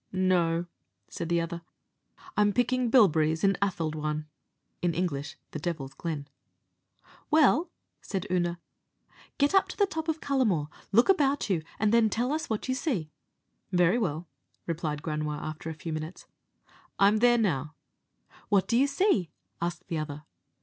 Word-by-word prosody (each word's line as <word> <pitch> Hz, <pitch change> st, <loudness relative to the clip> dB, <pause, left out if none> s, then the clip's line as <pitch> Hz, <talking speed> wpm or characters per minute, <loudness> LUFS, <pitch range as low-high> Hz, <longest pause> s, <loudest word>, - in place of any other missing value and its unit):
"No," 175 Hz, -2 st, +2 dB, 0.4 s
said 170 Hz, -, -5 dB
the 170 Hz, 0 st, +2 dB
other; 170 Hz, 0 st, -4 dB, 0.7 s
"I'm 205 Hz, -1 st, +3 dB
picking 250 Hz, +1 st, +1 dB
bilberries 160 Hz, -, +4 dB
in 195 Hz, 0 st, +5 dB
Althadhawan" 155 Hz, -5 st, -1 dB, 0.6 s
(Anglicé, 170 Hz, -5 st, -1 dB, 0.2 s
the 155 Hz, -, -5 dB
Devil's 150 Hz, -5 st, -4 dB
Glen). 145 Hz, -1 st, -4 dB, 1.0 s
"Well," 315 Hz, +2 st, +4 dB, 0.3 s
said 195 Hz, -1 st, -4 dB
Oonagh, 175 Hz, -1 st, +1 dB, 0.8 s
"get 285 Hz, +3 st, +2 dB
up 390 Hz, -, +5 dB
to -, -, -8 dB
the 405 Hz, -, +4 dB
top 320 Hz, -4 st, -4 dB
of 320 Hz, -1 st, -1 dB
Cullamore, 220 Hz, -, +1 dB, 0.2 s
look 235 Hz, +4 st, +5 dB
about 285 Hz, -, +2 dB
you, 170 Hz, -4 st, +1 dB, 0.2 s
and 215 Hz, +1 st, +2 dB
then 230 Hz, -2 st, +5 dB
tell 240 Hz, +5 st, 0 dB
us 315 Hz, +1 st, -3 dB
what 220 Hz, +1 st, -2 dB
you 260 Hz, -, +1 dB
see." 230 Hz, -, -2 dB, 0.6 s
"Very 180 Hz, +4 st, +3 dB
well," 170 Hz, -5 st, -2 dB, 0.4 s
replied 155 Hz, -3 st, -3 dB
Granua; 150 Hz, -1 st, -2 dB
after 155 Hz, +1 st, -6 dB
a 160 Hz, -, -5 dB
few 160 Hz, +1 st, -5 dB
minutes, 155 Hz, +3 st, -6 dB, 0.7 s
"I 195 Hz, -, +6 dB
am 210 Hz, +2 st, +4 dB
there 240 Hz, +2 st, +5 dB
now." 155 Hz, -, 0 dB, 0.7 s
"What 200 Hz, -2 st, +3 dB
do 230 Hz, -, +2 dB
you 275 Hz, +3 st, +4 dB
see?" 280 Hz, -, +2 dB, 0.3 s
asked 175 Hz, +1 st, -3 dB
the 165 Hz, -, -2 dB
other. 150 Hz, -1 st, -5 dB
180 Hz, 150 wpm, -28 LUFS, 155-240 Hz, 1.0 s, I